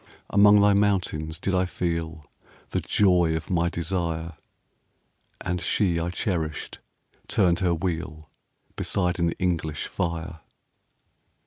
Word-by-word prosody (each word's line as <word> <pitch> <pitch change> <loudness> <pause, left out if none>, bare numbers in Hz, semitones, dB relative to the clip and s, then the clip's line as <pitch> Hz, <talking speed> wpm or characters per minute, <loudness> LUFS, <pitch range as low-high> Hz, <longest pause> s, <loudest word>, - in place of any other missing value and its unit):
Among 105 +1 +7
thy 100 0 +5
mountains 90 -6 0
did 95 - -2
I 95 0 +2
feel 85 -3 -3 0.5
The - - 0
joy 90 -5 +3
of 80 - -5
my 85 -1 +2
desire; 85 -1 -2 1.1
10 - - -2
And 90 -1 -2
she 90 -5 +1
I 85 +1 -2
cherished 85 -4 -3 0.5
turned 85 -2 +2
her 90 -3 +2
wheel 80 -3 -4 0.5
Beside 90 -2 -1
an 85 -1 +1
English 80 -4 -2
fire. 85 -2 -3
85 Hz, 120 wpm, -25 LUFS, 80-95 Hz, 1.1 s, Among